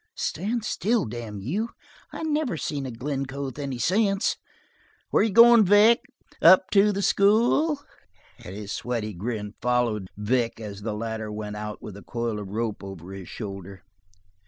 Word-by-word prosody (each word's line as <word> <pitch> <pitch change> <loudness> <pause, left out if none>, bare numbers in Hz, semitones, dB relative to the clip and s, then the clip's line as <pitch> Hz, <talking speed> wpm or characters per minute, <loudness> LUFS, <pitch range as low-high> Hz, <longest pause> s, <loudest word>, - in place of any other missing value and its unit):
Stand 220 +2 -2
still, 215 +1 0
damn 110 -3 -6
you. 200 - -2 0.4
I - - -6
never 300 - 0
seen 140 -3 -3
a - - -5
Glencoe 135 +2 -4
with 130 +1 -7
any 135 -3 -3
sense! 195 - +1 0.8
Where - - +4
you 220 - +2
goin', 235 +2 +8
Vic? 210 +4 +6 0.4
Up 185 0 +7
to 205 +1 +5
the 200 0 -2
school?" 235 +11 +3 0.6
And 95 - -8
his 105 -1 -7
sweaty 115 -3 -3
grin 105 +2 -4
followed 120 -5 0
Vic 115 +2 0
as 105 -2 -7
the 105 0 -3
latter 110 -1 -4
went 105 0 -5
out 105 0 -6
with 105 - -7
the 100 - -11
coil 115 -1 -3
of 100 -2 -7
rope 110 0 -3
over 95 -1 -9
his 95 -2 -9
shoulder. 95 -3 -8
120 Hz, 160 wpm, -25 LUFS, -, 0.8 s, goin